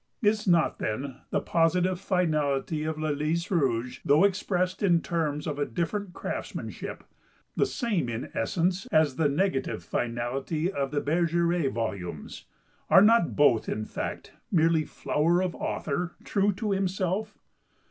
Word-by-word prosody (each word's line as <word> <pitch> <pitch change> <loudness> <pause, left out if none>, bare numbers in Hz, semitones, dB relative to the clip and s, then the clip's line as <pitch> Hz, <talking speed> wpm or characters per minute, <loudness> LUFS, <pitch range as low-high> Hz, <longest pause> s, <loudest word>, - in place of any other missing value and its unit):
Is 210 0 +2
not, 170 -3 +3
then, 130 +4 -3
the - - +1
positive 180 +2 +2
finality 155 -5 0
of 160 0 -2
"Le 155 0 -2
Lys 155 +5 -1
Rouge," 125 -7 0
though 150 +5 +4
expressed 185 -1 0
in 175 -4 +4
terms 155 -4 -2
of 145 -2 -3
a 145 - +1
different 180 - -2
craftsmanship, - - -5 0.5
the - - +2
same, 210 - -1
in 115 +1 -5
essence, 180 - 0
as 155 -4 +3
the 155 -3 +3
negative 150 -1 -1
finality 130 +8 -2
of 140 -6 -2
the 145 0 -1
"Bergeret" 170 -1 +1
volumes? 95 -9 -5 0.4
Are - - +8
not 225 -4 +4
both, 135 -7 +4
in 110 - -2
fact, - - -5 0.2
merely 165 -2 +3
flower 165 +4 +1
of 185 -1 -1
author 170 +4 -3
true 205 0 +2
to 210 +2 -3
himself? 195 +2 -1
165 Hz, 140 wpm, -27 LUFS, 140-185 Hz, 0.5 s, Are